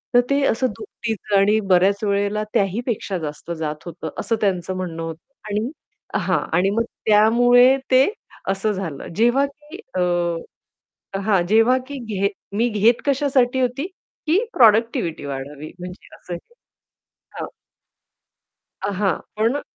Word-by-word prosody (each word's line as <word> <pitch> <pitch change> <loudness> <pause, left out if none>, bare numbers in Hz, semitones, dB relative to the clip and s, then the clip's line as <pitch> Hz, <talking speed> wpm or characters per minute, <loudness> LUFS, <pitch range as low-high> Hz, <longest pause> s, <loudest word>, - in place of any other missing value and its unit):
तर 245 - +8
ते 280 0 +2
असं 255 +3 +1
दुपटीचं 220 - -2
आणि 210 +2 +4
बऱ्याच 195 +3 +4
वेळेला 205 +1 0
त्याही 200 +3 +1
पेक्षा 205 -5 -2
जास्त 155 +2 -6
जात 150 -1 -4
होतं 170 0 -6
असं 230 - 0
त्यांचं 185 -2 0
म्हणणं 175 -3 -4
होतं 165 +10 -8 0.2
आणि 210 +4 -1 0.5
हां. - - +1 0.2
आणि 190 +2 +3
मग 225 +3 +1 0.2
त्यामुळे 245 +4 +6
ते 260 +1 +7 0.5
असं 195 +2 0
झालं. 170 -8 -5
जेव्हा, 240 +6 +3
की 295 +3 -12 0.2
अ, - - 0 1.2
हां, 195 -2 +2
जेव्हा 225 +5 +5
की 285 - -6 0.2
घेत 200 +1 +1 0.3
मी 240 +2 +2
घेत 220 +2 +3
कशासाठी 270 -2 +2
होती, 255 +6 -1 0.4
की 370 +9 +3
प्रॉडक्टिव्हिटी 220 - +3
वाढावी 140 +2 -6
म्हणजे 180 +1 -10
असं 180 - -9
हे 175 - -9 0.9
हां. - - -3 1.4
अ, 200 - -1
हां, 195 -4 +2 0.2
पण 230 +7 +1
210 Hz, 135 wpm, -22 LUFS, 185-245 Hz, 1.4 s, तर